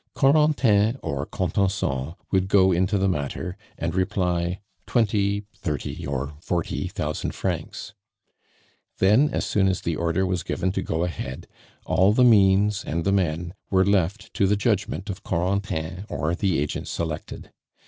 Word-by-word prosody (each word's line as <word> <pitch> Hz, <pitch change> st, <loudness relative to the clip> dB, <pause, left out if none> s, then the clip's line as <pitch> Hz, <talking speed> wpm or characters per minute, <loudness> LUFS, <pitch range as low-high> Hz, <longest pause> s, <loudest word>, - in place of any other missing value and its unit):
Corentin 135 Hz, -6 st, +4 dB
or 70 Hz, +1 st, -3 dB
Contenson 85 Hz, -6 st, -1 dB, 0.2 s
would 95 Hz, -1 st, +2 dB
go 95 Hz, -1 st, +5 dB
into 95 Hz, +3 st, +2 dB
the 95 Hz, 0 st, +2 dB
matter 90 Hz, +2 st, -2 dB, 0.2 s
and 85 Hz, 0 st, -2 dB
reply: 90 Hz, -2 st, 0 dB, 0.3 s
"Twenty, 105 Hz, -3 st, +1 dB
thirty, 75 Hz, -6 st, -4 dB
or 70 Hz, +1 st, -3 dB
forty 85 Hz, -2 st, -2 dB
thousand -, -, -3 dB
francs." -, -, -4 dB, 1.0 s
Then, 110 Hz, +10 st, +4 dB
as -, -, -2 dB
soon 95 Hz, -2 st, +2 dB
as 95 Hz, -1 st, 0 dB
the 85 Hz, -, -1 dB
order 85 Hz, +3 st, 0 dB
was 90 Hz, -2 st, -1 dB
given 95 Hz, +3 st, -1 dB
to 95 Hz, -, -2 dB
go 80 Hz, -2 st, -1 dB
ahead, 85 Hz, -3 st, -5 dB, 0.4 s
all 95 Hz, +3 st, +3 dB
the 125 Hz, -, +4 dB
means 100 Hz, -3 st, +4 dB
and 85 Hz, +2 st, -2 dB
the 100 Hz, -, +3 dB
men 85 Hz, -2 st, 0 dB, 0.2 s
were 95 Hz, -1 st, +3 dB
left 100 Hz, +1 st, 0 dB
to 100 Hz, -, +2 dB
the 105 Hz, +1 st, +2 dB
judgment 100 Hz, -2 st, -1 dB
of 95 Hz, -, -8 dB
Corentin 95 Hz, 0 st, -2 dB
or 75 Hz, +4 st, -1 dB
the 95 Hz, -1 st, 0 dB
agent 75 Hz, +1 st, -2 dB
selected. 80 Hz, -2 st, -5 dB
95 Hz, 150 wpm, -24 LUFS, 85-100 Hz, 1.0 s, go